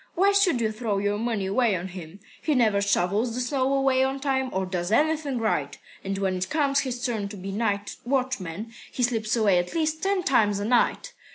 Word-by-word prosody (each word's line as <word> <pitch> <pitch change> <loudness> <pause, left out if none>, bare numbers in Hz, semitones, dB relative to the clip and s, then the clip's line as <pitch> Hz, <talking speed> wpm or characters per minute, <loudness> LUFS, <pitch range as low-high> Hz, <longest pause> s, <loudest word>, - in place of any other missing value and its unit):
Why 390 +3 +4
should 395 -9 +3
you 220 -1 +1
throw 215 -2 -2
your 205 +1 0
money 225 -4 -1
away 205 +2 +2
on 180 +1 -4
him? 180 +1 -10 0.2
He 305 - +1
never 215 -5 +3
shovels 200 +4 +1
the - - -2
snow 260 +1 0
away 270 -1 +3
on 265 +1 -1
time, 265 -2 0
or 190 0 -1
does 180 0 -3
anything 300 +1 +1
right. 215 -11 -1 0.3
And 195 0 -3
when 190 -1 0
it 185 +1 -3
comes 280 -3 +2
his 250 -1 -3
turn 220 -5 -2
to 205 - -8
be 195 +1 -6
night 205 -1 -2
watchman, 230 -6 -2 0.2
he 250 - -2
slips 225 -3 0
away 205 -6 +3
at 175 - -4
least 315 -1 0
ten 390 -1 +1
times 210 -8 +3
a 205 - -2
night. 250 - +1
225 Hz, 210 wpm, -25 LUFS, 200-270 Hz, 0.3 s, Why